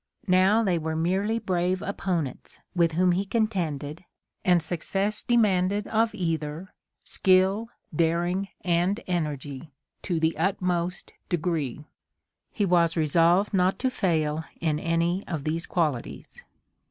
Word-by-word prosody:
Now 190 +4 +4
they 180 -5 +1
were 160 0 -3
merely 190 +7 0
brave 185 -2 -1
opponents, 175 -8 -3 0.2
with 170 -2 +3
whom 180 +2 +3
he 180 +3 +1
contended, 175 - -2 0.4
and 180 -1 +4
success 195 +5 -2
demanded 205 -3 +2
of 220 0 +1
either 165 -1 -3 0.3
skill, 190 +4 +2 0.3
daring 175 +4 +1
and 180 +4 +1
energy 150 -4 -3 0.3
to 175 -4 -1
the 160 0 +1
utmost 180 -1 -1 0.2
degree. 160 -5 -2 0.7
He 205 - 0
was 170 -2 +3
resolved 170 +6 +3
not 185 0 +2
to 260 - 0
fail 160 -7 0 0.2
in 155 -2 0
any 170 +3 0
of 160 -5 -3
these 165 +3 -2
qualities. 150 -9 -3
175 Hz, 120 wpm, -26 LUFS, 160-195 Hz, 0.7 s, Now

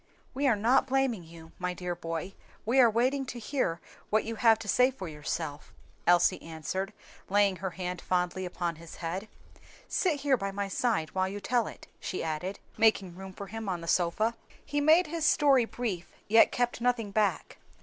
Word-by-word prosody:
"We 280 +2 +1
are 240 - +4
not 235 +6 +3
blaming 265 -7 +1
you, 165 0 -13
my 180 0 -2
dear 180 0 -3
boy, 165 +2 -5 0.3
we 245 +5 +3
are 240 -2 +8
waiting 255 +5 +1
to 245 - -6
hear 230 - -1
first - - -21
what 215 +1 +2
you 225 0 -5
have 225 -1 +5
to 220 - -9
say 250 +5 +4
for 245 -9 -7
yourself," 150 -1 -5 0.3
Elsie 175 0 +4
answered, 165 +5 -4 0.4
laying 200 -1 +3
her 190 +2 -3
hand 180 0 -5
fondly 180 0 0
upon 175 -2 -3
his 165 0 -11
head. 180 +5 -4 0.6
"Sit 315 -7 0
here 280 -3 +3
by 195 -2 -3
my 200 0 -3
side 195 -5 0
while 185 0 +1
you 205 +1 -5
tell 235 +2 +1
it," - - -10
she 185 - -4
added, 165 +5 -3 0.2
making 200 -5 +3
room 190 +1 -8
for 200 - -7
him 220 +1 -5
on 175 -2 -2
the 170 - -8
sofa. 185 +8 +1 0.3
He 290 0 -1
made 320 +5 +6
his 325 +1 -4
story 275 -5 +5
brief, 215 -8 -4 0.2
yet 225 +2 +6
kept 245 -1 -1
nothing 235 -4 +1
back. 200 -4 0
200 Hz, 190 wpm, -29 LUFS, 175-240 Hz, 0.6 s, are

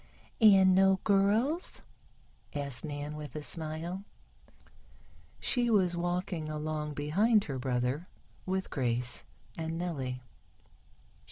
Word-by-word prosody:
"And 195 -3 +7
no 190 0 +5
girls?" 215 - +2 0.7
asked 140 -3 -3
Nan 145 -1 -5
with 150 0 -8
a 150 - -4
smile. 165 +5 -3 1.4
She 245 -2 +2
was 185 -5 +3
walking 175 -2 -2
along 150 -1 -3
behind 200 +10 +3
her 135 -3 -4
brother, 125 +6 -1 0.4
with 190 0 -2
Grace 120 - -1 0.3
and 165 0 -3
Nellie. 135 -8 -3
160 Hz, 100 wpm, -31 LUFS, 145-190 Hz, 1.4 s, And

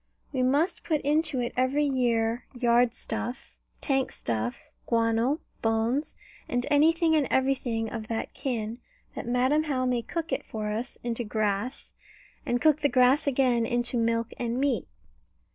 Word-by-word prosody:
We 260 - 0
must 285 +8 +1
put 310 -3 +1
into 300 -2 +1
it 240 - -3
every 260 +4 +2
year 240 -3 0
yard 240 0 +3
stuff, 225 +3 -5 0.2
tank 270 -2 0
stuff, 115 +1 -4 0.2
guano, 230 +5 +1 0.2
bones, 225 +6 0 0.3
and 245 0 0
anything 320 +2 +4
and 295 -3 +2
everything 255 -4 0
of 220 -1 -6
that 225 0 -3
kin, 230 -3 -3 0.3
that - - -6
Madam 260 +6 +2
How 260 -4 0
may 250 -1 +1
cook 330 +6 -4
it - - -1
for 215 -1 -4
us 230 +4 -4
into 240 0 -2
grass, 215 +2 -2 0.6
and 245 - +1
cook 305 +1 +4
the 285 - +2
grass 255 +4 +4
again 250 -3 +2
into 240 +1 0
milk 230 0 0
and 240 +1 -1
meat. 280 0 0
245 Hz, 150 wpm, -27 LUFS, 230-275 Hz, 0.6 s, anything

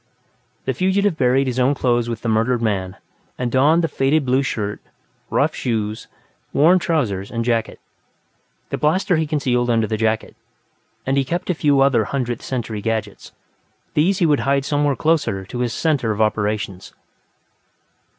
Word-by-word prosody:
The 130 - 0
fugitive 190 +5 +1
buried 130 -1 +2
his 130 -1 -2
own 130 +3 +3
clothes 120 -3 +1
with 115 -1 -5
the - - -2
murdered 115 +3 +1
man, 100 -4 -1 0.4
and 125 -1 -2
donned 150 +7 +4
the - - +2
faded 140 +1 +1
blue 130 +1 +2
shirt, 105 -6 -3 0.5
rough - - +1
shoes, 110 -3 -3 0.5
worn 170 +6 +5
trousers 115 - -1
and 115 -1 -3
jacket. 115 -2 -1 0.9
The - - -2
blaster 175 +3 +2
he 160 -1 0
concealed 125 -5 0
under 115 -2 +2
the 110 0 -2
jacket, 110 0 -1 0.7
and 135 +1 0
he 135 - +3
kept 175 +7 -2
a - - +1
few 145 -4 +2
other 135 -5 +3
Hundredth 120 -3 -3
Century 115 -5 -4
gadgets; 110 -2 -3 0.6
these 180 +6 +2
he 180 - +2
would 150 -3 +3
hide 140 0 +1
somewhere 145 -1 +1
closer 145 -10 0
to 120 +5 -6
his 120 -1 0
center 145 -7 0
of 105 0 -2
operations. 105 -3 -1
125 Hz, 160 wpm, -20 LUFS, 110-145 Hz, 0.9 s, worn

